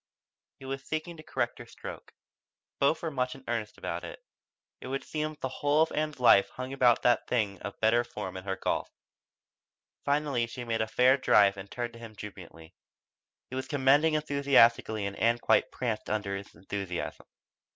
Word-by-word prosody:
He 135 - -12
was 135 +1 -4
seeking 155 +3 -4
to - - -9
correct - - -2
her - - -9
stroke. - - -10 0.6
Both 140 +5 +2
were 165 - -2
much 125 -2 -1
in 135 - -14
earnest 115 -2 -3
about - - -4
it. - - -7 0.6
It - - -8
would 135 +1 -3
seem 155 0 -2
that 150 - -21
the 130 - -1
whole 145 +2 +4
of 160 - -3
Ann's 155 -2 -2
life 115 -5 +6
hung 130 +1 -6
upon 125 -3 +5
that 120 -2 +3
thing 105 -6 -1
of 100 +1 -7
better 115 +2 +4
form 110 -6 -6
in 95 0 -7
her 95 -1 -1
golf. - - -2 1.1
Finally 140 -4 +1
she 120 +1 -7
made 115 -1 -1
a 110 - 0
fair 125 +4 +4
drive 100 -6 +5
and 100 0 -9
turned 120 -1 -4
to 115 - -12
him 115 -2 -10
jubilantly. 90 -6 -11 0.8
He - - -4
was 130 - -3
commending 145 +2 +4
enthusiastically 140 -8 +3
and 100 0 -4
Ann 115 +1 +3
quite - - +3
pranced 115 -4 -3
under 100 -2 -1
his 100 +1 -8
enthusiasm. 95 +1 -5
120 Hz, 185 wpm, -29 LUFS, 105-140 Hz, 1.1 s, life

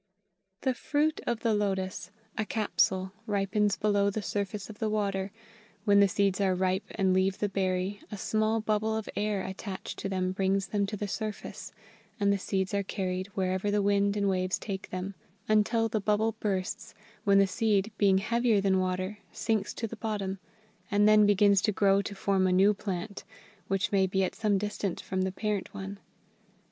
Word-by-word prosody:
] 195 0 -51
"THE 260 - +2
fruit 295 +4 0
of 235 -2 -1
the 225 -2 +2
lotus 190 -3 -1 0.3
a 220 - 0
capsule 190 -3 +1 0.2
ripens 205 0 +1
below 205 -1 +2
the 205 +1 -3
surface 200 0 -3
of 215 -1 -11
the 220 - 0
water. 200 -2 -1 0.5
When 200 -2 +5
the 200 - +7
seeds 200 0 +1
are 190 -2 +2
ripe 185 +2 0
and 190 -2 +2
leave 190 +1 +2
the 205 - 0
berry, 190 +1 -1
a 210 - -5
small 215 +2 +1
bubble 215 +1 0
of 220 - -5
air 205 -2 0
attached 190 0 -6
to 195 - -3
them 185 -1 0
brings 195 +1 +1
them 200 0 0
to 210 +1 -4
the 205 - -3
surface, 215 +1 -5 0.5
and 200 0 +3
the 200 - -1
seeds 190 0 -1
are 200 - +2
carried 185 -1 -3
wherever 190 +1 0
the 205 0 +2
wind 200 0 +2
and 200 -1 +1
waves 185 -1 +1
take 190 -2 -5
them 185 +2 -4 0.3
until 220 +2 +3
the 220 -1 -1
bubble 210 +2 +2
bursts; 190 -4 -3 0.3
when 200 -1 +4
the 195 - +6
seed, 205 +1 +1
being 195 -2 +5
heavier 230 +2 +2
than 195 -1 +2
water, 185 +2 -2
sinks 215 -3 -1
to 230 - -3
the 225 +1 -6
bottom, 200 -4 -3 0.5
and 205 +1 +4
then 215 -1 +6
begins 200 -1 +5
to 210 - +2
grow 195 0 +3
to 200 - -6
form 195 -1 +1
a - - +2
new 195 +3 +5
plant, 200 0 -5 0.4
which 195 0 0
may 195 -2 +3
be 190 +1 +1
at 185 - -1
some 210 -3 +1
distance 205 -2 -3
from 190 -1 -2
the 190 0 0
parent 210 0 -2
one. 195 +1 -6
200 Hz, 190 wpm, -29 LUFS, 190-210 Hz, 0.5 s, the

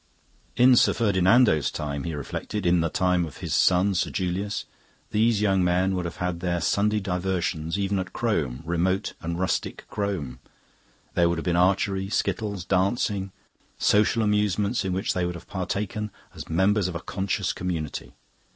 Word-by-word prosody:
In 125 +1 +6
Sir - - +5
Ferdinando's 100 - +3
time, 70 -1 -4
he 85 -2 -3
reflected, 95 +7 -4
in 85 -1 +4
the 80 - 0
time 90 0 +1
of 80 -4 -7
his - - -4
son, 95 +2 +4
Sir 90 - 0
Julius, 95 +2 -2 0.5
these 110 0 +2
young 95 -3 +3
men 90 +2 +2
would 90 -1 -2
have 85 - -5
had 90 -1 -2
their 85 0 -1
Sunday 105 +6 +1
diversions 90 -3 -2
even 100 -1 0
at 95 -1 -4
Crome, 80 - -1
remote 90 +4 0
and 85 0 -3
rustic 95 +1 -2
Crome. 95 -10 -3 0.7
There 85 -1 +3
would 85 - 0
have 80 - -4
been 90 -2 +1
archery, 95 +2 +2
skittles, 100 -4 -2
dancing 100 0 0 0.5
social 105 +2 +3
amusements 105 +1 +1
in 95 - -2
which 95 +2 -1
they 90 - -1
would 90 0 -2
have 85 - -11
partaken 100 +2 -3 0.2
as - - -9
members 95 +4 +2
of 90 - -5
a - - -2
conscious 95 +2 -2
community. 85 -5 -4
95 Hz, 165 wpm, -25 LUFS, 85-100 Hz, 0.7 s, In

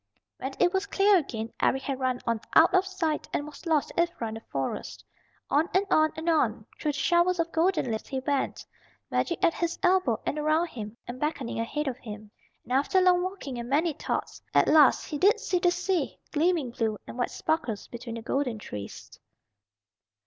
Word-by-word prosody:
When 265 +1 -4
it 355 +1 +4
was 385 +1 0
clear 400 +1 +4
again 230 -7 -5
Eric 265 0 +2
had 270 -2 -3
run 255 -1 -1
on 230 -2 0
out - - +7
of 375 0 +3
sight, 335 -5 -2
and 290 - -1
was 300 +3 -10
lost 310 -3 +2
to - - +1
Ivra 340 -10 -2
in - - -6
the 225 - -6
Forest. 135 -1 -4 0.5
On 310 +5 +3
and 385 +2 +4
on 310 0 +4
and 320 +1 -6
on 235 -10 +2
through 300 - 0
the - - -5
showers 345 +4 +3
of 335 0 0
golden 330 -6 +1
leaves 220 - -4
he 265 - -2
went, 275 +1 -2 0.5
magic 340 - 0
at 335 -2 +5
his 340 0 -2
elbow 360 - +3
and 300 - -1
around 310 +3 +2
him, 220 -4 -7
and 245 +1 -6
beckoning 295 -6 -2
ahead 295 +6 -2
of 260 -1 -3
him. 210 -3 -9 0.3
And 250 - -5
after 285 +8 +3
long 365 -1 +4
walking 360 -9 -4
and 235 0 -6
many 310 +4 +2
thoughts, - - -4
at - - +5
last 300 -3 +6
he 295 - -4
did 400 +6 +5
see 360 - 0
the 355 - +4
sea, 355 -4 -1
gleaming 320 -4 +1
blue 225 -3 -1
and - - -9
white 245 -1 -1
sparkles 305 -10 -2
between 235 -1 -7
the 230 - -7
golden 255 -2 -1
trees. 105 - -8
295 Hz, 200 wpm, -27 LUFS, 240-345 Hz, 0.5 s, out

